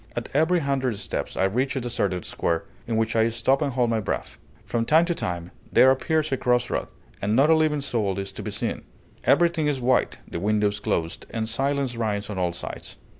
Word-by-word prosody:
At - - -4
every 165 +4 +3
hundred 135 -5 0
steps - - -4
I - - +2
reach 125 +9 +1
a - - 0
deserted 100 -7 -1
square, 85 -1 -1 0.2
in 115 -1 0
which 110 0 0
I 115 0 +4
stop 120 +5 +1
and 140 -3 0
hold 120 -2 +2
my 115 - +1
breath; 100 - -4 0.3
from 115 - 0
time 160 +7 +4
to 175 - 0
time 90 - -4 0.2
there 130 - +7
appears 155 +3 0
a 135 - +1
cross 125 0 +1
road, - - -1 0.3
and 105 +2 +1
not 140 +5 +5
a - - +7
living 155 -2 +2
soul 110 -8 -1
is 100 0 -4
to - - -8
be - - -4
seen; - - -2 0.4
everything 170 -3 +3
is 145 -3 0
white, 125 +1 +2
the - - -5
windows 105 +1 +1
closed, 85 0 -2
and 110 -1 -3
silence 135 +2 0
reigns 105 -3 -2
on 95 - -3
all 90 -1 +1
sides. 85 - -7
120 Hz, 215 wpm, -25 LUFS, 105-140 Hz, 0.4 s, there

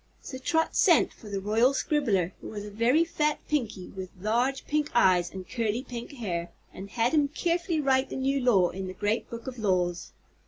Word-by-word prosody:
So 260 - -8
Trot 320 +4 0
sent 345 -5 +4
for 215 - -13
the 200 -1 -2
Royal 225 +7 +2
Scribbler, 220 - +1
who - - -8
was 205 -1 -6
a 210 - -8
very 240 +9 +3
fat 300 -2 0
Pinky 225 -11 -2
with 190 -1 -7
large 240 +7 0
pink 300 0 0
eyes 180 -6 +4
and 190 -1 -8
curly 230 0 -1
pink 240 +2 -7
hair, 175 -9 -3 0.2
and 195 +1 -8
had 235 +5 0
him 295 -2 +4
carefully 340 +2 -1
write 270 -2 +2
the - - -5
new 270 +1 0
law 210 -9 +3
in 190 +1 -5
the 185 - -7
Great 210 +2 -1
Book 230 0 -7
of 255 -2 -6
Laws. 180 -4 0
235 Hz, 200 wpm, -28 LUFS, 195-275 Hz, 0.2 s, sent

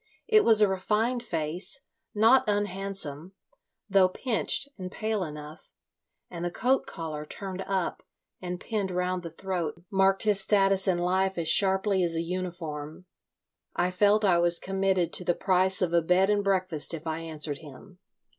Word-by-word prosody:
It 435 -1 +5
was 220 -2 +6
a - - +5
refined 215 +6 -1
face, 170 - -3 0.3
not 225 +5 +5
unhandsome, 195 -5 -3 0.5
though 190 -2 +4
pinched 250 +6 -1
and 185 -2 -8
pale 215 -2 -2
enough, 150 -1 -10 0.6
and 170 -1 -8
the 175 - -1
coat 255 +9 0
collar 155 -2 -6
turned 190 +4 -7
up 190 -3 -2 0.4
and 180 -1 -5
pinned 205 -3 -3
round 180 0 -2
the 170 - -7
throat 170 -1 -5
marked 195 +1 +2
his 210 -2 +4
status 195 -1 +2
in 185 -2 +2
life 190 +2 0
as 165 -2 -1
sharply 190 0 +4
as 170 -1 +2
a 165 - -1
uniform. 170 -3 -6 0.7
I 180 +1 0
felt 205 +3 +3
I 175 -3 +3
was 170 0 +4
committed 190 -2 -1
to - - +3
the 175 -1 0
price 190 0 +1
of 170 -2 -1
a 170 - +4
bed 180 +4 +2
and 205 -1 +1
breakfast 185 -5 +1
if 160 - -10
I 160 0 -3
answered 155 -3 -5
him. 165 +5 -14
185 Hz, 165 wpm, -27 LUFS, 170-195 Hz, 0.7 s, was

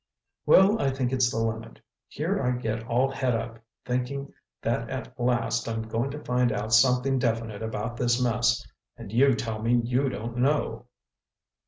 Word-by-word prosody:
"Well, 200 +4 +6
I 135 - +2
think 130 -1 -1
it's 130 -2 +3
the 115 - -4
limit. 115 0 -3 0.3
Here - - -2
I 125 0 0
get 115 -1 -3
all 125 +3 +2
het 130 -3 0
up, 115 0 -5 0.3
thinking 125 +3 -3 0.3
that - - -1
at - - -5
last 120 -1 0
I'm 115 0 -2
going 115 +4 -2
to 145 +2 -7
find 125 -1 +1
out 110 +2 -2
something 125 +2 +4
definite 115 -3 -1
about 110 +1 -4
this 120 0 +1
mess—and 120 -3 -2
you 130 +3 +4
tell 110 -3 -4
me 120 +2 +3
you 125 +3 +1
don't 120 0 -5
know." 125 -3 0
120 Hz, 165 wpm, -26 LUFS, 115-130 Hz, 0.3 s, Well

